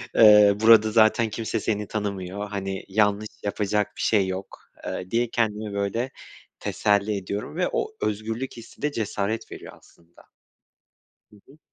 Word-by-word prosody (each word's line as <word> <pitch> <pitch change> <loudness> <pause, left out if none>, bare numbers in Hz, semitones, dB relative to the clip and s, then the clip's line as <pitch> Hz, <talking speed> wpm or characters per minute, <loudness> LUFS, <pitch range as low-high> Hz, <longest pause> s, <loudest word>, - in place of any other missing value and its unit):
eee, 105 -2 +8
burada 110 -1 +6
zaten 110 +1 +4
kimse 110 +1 -3
seni 105 -2 -2
tanımıyor, 100 -1 -4
hani, 95 -2 -4
yanlış 105 +1 +1 0.2
yapacak 105 0 0
bir - - -5
şey 100 -4 +2
yok, 95 +1 -6 0.3
eee, 90 +1 -5
diye 120 0 +1
kendime 110 -3 -1
böyle 100 +6 -2 0.5
teselli 105 0 0
ediyorum 100 +8 -5
ve 180 +1 +1
o - - -1
özgürlük 110 +5 -3
hissi 115 0 -13
de 150 - 0
cesaret 110 -2 -3
veriyor - - -9
aslında. 85 0 -22 1.1
Hı - - -17
hı. 140 +3 -18
105 Hz, 145 wpm, -24 LUFS, 100-110 Hz, 1.1 s, eee